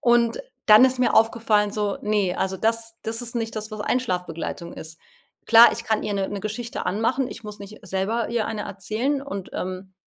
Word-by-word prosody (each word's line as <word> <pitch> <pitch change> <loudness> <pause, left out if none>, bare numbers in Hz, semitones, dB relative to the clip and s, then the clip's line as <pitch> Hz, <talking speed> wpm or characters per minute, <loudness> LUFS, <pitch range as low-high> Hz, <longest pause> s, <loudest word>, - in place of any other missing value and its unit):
Und 240 - +3 0.3
dann 215 +4 +9
ist 255 -1 +2
mir 250 - +3
aufgefallen, 220 -2 +3
so: 205 -2 -1
„Ne, 210 -4 +1
also 190 0 -1
das 225 +2 -1
das 225 +2 -3
ist 240 0 -6
nicht 225 -1 -3
das, 215 +1 -5
was 215 - -6
Einschlaf-Begleitung 180 -7 -2
ist." 160 0 -10 0.5
Klar, 230 +1 +8
ich 230 - -5
kann 220 -1 0
ihr 205 - -2
’ne 195 -1 -1
’ne 205 - -4
Geschichte 220 +3 -4
anmachen: 230 +6 0
Ich - - -9
muss 210 0 -7
nicht 205 +2 -10
selber 195 +5 -1
ihr 235 -2 -1
eine 215 -2 -3
erzählen 220 +9 -2
und, 200 -9 -6
ähm, 185 +1 -5
215 Hz, 195 wpm, -24 LUFS, 200-230 Hz, 0.5 s, dann